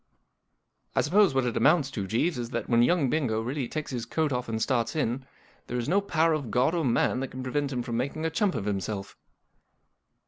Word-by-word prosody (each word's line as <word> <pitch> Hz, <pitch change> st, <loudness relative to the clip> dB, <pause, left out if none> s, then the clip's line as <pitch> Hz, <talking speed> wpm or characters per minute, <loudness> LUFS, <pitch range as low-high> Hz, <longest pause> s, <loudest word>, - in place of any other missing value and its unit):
" -, -, -45 dB
I -, -, +4 dB
suppose 190 Hz, -1 st, +3 dB
what 135 Hz, -1 st, +2 dB
it 120 Hz, -, -1 dB
amounts 145 Hz, -2 st, +3 dB
to, 100 Hz, -7 st, -4 dB
Jeeves, 125 Hz, -, 0 dB
is 120 Hz, -1 st, -4 dB
that, 120 Hz, -1 st, -3 dB
when 120 Hz, -1 st, +4 dB
young 145 Hz, +3 st, +3 dB
Bingo 125 Hz, -5 st, 0 dB
really 125 Hz, +3 st, -2 dB
takes 155 Hz, +2 st, -4 dB
his 120 Hz, -3 st, -4 dB
coat 155 Hz, -3 st, 0 dB
off 125 Hz, -1 st, -3 dB
and 110 Hz, -1 st, -2 dB
starts 120 Hz, 0 st, 0 dB
in, 130 Hz, -3 st, -1 dB, 0.4 s
there 125 Hz, -, -3 dB
is 120 Hz, -, -2 dB
no 195 Hz, +6 st, +3 dB
power 165 Hz, -4 st, +2 dB
of 145 Hz, -6 st, -2 dB
God 125 Hz, +9 st, +2 dB
or 170 Hz, -2 st, 0 dB
man 125 Hz, 0 st, +2 dB
that 135 Hz, -, -2 dB
can 130 Hz, 0 st, -7 dB
prevent 140 Hz, +2 st, -1 dB
him 125 Hz, -2 st, -2 dB
making 140 Hz, +6 st, -2 dB
a 160 Hz, -, 0 dB
chump 195 Hz, +2 st, +1 dB
of 105 Hz, -4 st, -3 dB
himself." 100 Hz, 0 st, -3 dB
130 Hz, 220 wpm, -27 LUFS, 120-155 Hz, 0.4 s, I